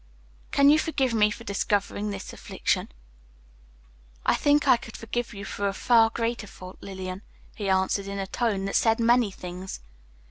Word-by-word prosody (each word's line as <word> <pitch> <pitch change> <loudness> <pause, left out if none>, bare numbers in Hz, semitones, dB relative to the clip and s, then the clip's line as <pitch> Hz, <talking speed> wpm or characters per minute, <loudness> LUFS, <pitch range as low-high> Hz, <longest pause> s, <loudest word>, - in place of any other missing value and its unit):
"Can 280 0 +5
you 305 - +5
forgive 275 -6 0
me 210 -2 +4
for 230 - -7
discovering 205 0 -1
this 200 -1 -6
affliction?" - - -2 1.4
"I - - +4
think 290 -1 +3
I 260 - +8
could 230 -1 -9
forgive 235 +1 -3
you 200 -2 -7
a 200 -1 0
far 225 +2 +4
greater 230 -1 -2
fault, 185 -1 -11
Lillian," 190 -1 -6 0.3
he 205 -3 -3
answered, 190 +1 +1
in 200 0 -4
a 195 - -2
tone 200 -1 -1
that 195 - -3
said 225 0 +3
many 235 -1 +4
things. 185 0 -7
210 Hz, 165 wpm, -26 LUFS, 195-235 Hz, 1.4 s, I